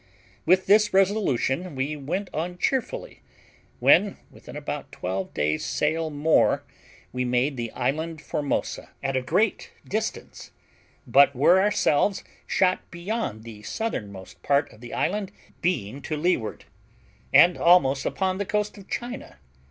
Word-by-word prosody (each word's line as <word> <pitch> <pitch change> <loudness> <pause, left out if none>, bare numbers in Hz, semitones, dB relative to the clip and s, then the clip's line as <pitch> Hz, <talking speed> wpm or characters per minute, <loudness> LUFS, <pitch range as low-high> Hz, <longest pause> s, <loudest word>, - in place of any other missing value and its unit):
With 185 +2 +4
this 210 0 +4
resolution 185 - +1
we 140 +3 -2
went 165 +8 -3
on 175 +3 -3
cheerfully, - - -2 0.6
when, 205 -1 +4
within - - -11
about - - -5
twelve 95 +1 -4
days' 75 +1 0
sail 160 +1 0
more, 150 +2 +2 0.5
we 125 0 -1
made 125 +3 +1
the 120 -2 -4
island 160 +3 -2
Formosa, 145 -1 -3
at 135 0 -1
a 130 - +1
great 200 - 0 0.2
distance, 220 +2 -4 0.5
but 140 0 +5
were 175 +9 +5
ourselves 200 -2 +2 0.2
shot 185 -1 +1
beyond 170 - -4
the 110 -2 -10
southernmost 105 - -5
part 145 +1 +1
of 105 - -18
the 120 - -9
island, 200 +1 -1 0.3
being 140 - -1
to 155 - -4
leeward, 150 -9 -1 0.7
and 175 0 +7
almost 140 -6 +4
upon 190 0 -1
the - - +1
coast 210 +1 -2
of 195 - -15
China. 240 +1 -6
160 Hz, 135 wpm, -25 LUFS, 130-195 Hz, 0.7 s, and